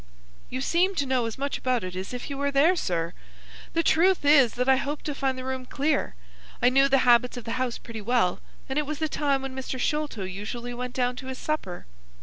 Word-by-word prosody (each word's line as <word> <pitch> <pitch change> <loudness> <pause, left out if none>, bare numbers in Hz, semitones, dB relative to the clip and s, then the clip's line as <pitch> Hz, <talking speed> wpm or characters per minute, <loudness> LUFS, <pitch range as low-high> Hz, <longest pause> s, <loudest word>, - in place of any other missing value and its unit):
"You 255 - -3
seem 360 +7 +2
to 285 - 0
know 255 -3 +1
as 225 - -6
much 280 +1 -2
about 250 -4 0
it 185 0 -5
as 185 +1 -5
if 250 -1 -6
you 280 - -4
were 280 +1 0
there, 285 +6 +4
sir. 170 - -1 0.6
The 330 - +2
truth 350 +1 +3
is 280 -5 +6
that 250 +1 0
I 265 0 +6
hoped 290 +2 -3
to 295 - -2
find 270 -2 -1
the 255 - -5
room 260 0 -3
clear. 280 - 0 0.4
I 245 - +5
knew 270 +2 +4
the 270 -1 +3
habits 245 +1 +4
of 245 - -6
the 230 - -5
house 250 -2 -1
pretty 225 -2 -8
well, 220 -5 +1 0.3
and 270 +2 0
it 295 - -2
was 305 0 -3
the 315 +1 0
time 280 -3 0
when 265 -1 -5
Mr. 265 0 -4
Sholto 295 -6 -1
usually 210 +6 -5
went 250 +1 -5
down 250 -1 0
to 260 - -7
his 260 -1 -5
supper. 255 - -3
260 Hz, 235 wpm, -26 LUFS, 240-285 Hz, 0.6 s, is